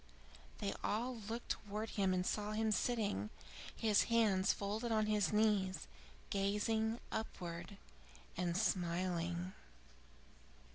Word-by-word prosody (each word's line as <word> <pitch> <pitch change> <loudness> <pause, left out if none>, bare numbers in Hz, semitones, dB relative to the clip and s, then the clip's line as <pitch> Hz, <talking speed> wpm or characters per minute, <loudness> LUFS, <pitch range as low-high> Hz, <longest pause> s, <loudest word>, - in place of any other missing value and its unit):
They - - -1
all 240 +4 0
looked 235 +1 -4
towards 210 +2 -3
him 195 -2 +2
and 180 0 +1
saw 210 +1 -1
him 220 0 +1
sitting, 205 - +1 0.5
his 215 -2 +4
hands 210 -5 +4
folded 215 +4 -2
on 215 -1 +3
his 210 -2 +2
knees, 210 -3 +2 0.5
gazing 220 +3 +1
upwards 175 -4 -4 0.6
and 175 0 0
smiling. 175 -2 0
205 Hz, 105 wpm, -38 LUFS, 185-220 Hz, 0.6 s, his